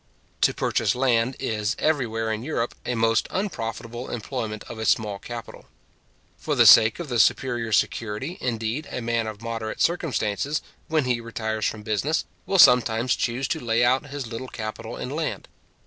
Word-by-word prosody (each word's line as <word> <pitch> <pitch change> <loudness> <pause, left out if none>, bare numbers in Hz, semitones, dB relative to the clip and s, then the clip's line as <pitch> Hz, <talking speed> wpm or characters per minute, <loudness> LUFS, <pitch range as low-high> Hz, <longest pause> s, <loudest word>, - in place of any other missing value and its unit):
To - - +5
purchase - - +1
land, 125 -1 +2
is, 110 -2 -1
everywhere 115 -7 0
in 110 - -4
Europe, 120 -3 -2
a 125 - 0
most 115 0 +2
unprofitable 120 - -4
employment 110 -2 -4
of 115 - -9
a 110 - -3
small 105 -3 +1
capital. 120 +1 -8 0.7
For - - -1
the - - +5
sake 110 +7 +8
of 170 - -5
the 120 -3 -1
superior 120 0 +2
security, 115 - -1
indeed, 115 +4 -2
a - - -3
man 115 -1 -1
of 110 0 -7
moderate 115 -1 -4
circumstances, 145 -4 0 0.2
when 155 -3 +1
he 125 -2 0
retires 110 -1 -2
from 110 -1 -5
business, 110 +9 0 0.2
will 195 - +1
sometimes 125 -5 +5
choose 125 +2 -1
to - - -1
lay 120 0 +2
out 130 +4 +2
his 140 -1 -5
little 115 +3 -6
capital 110 0 -6
in 125 - -5
land. 155 +2 -3
115 Hz, 165 wpm, -24 LUFS, 110-130 Hz, 0.7 s, sake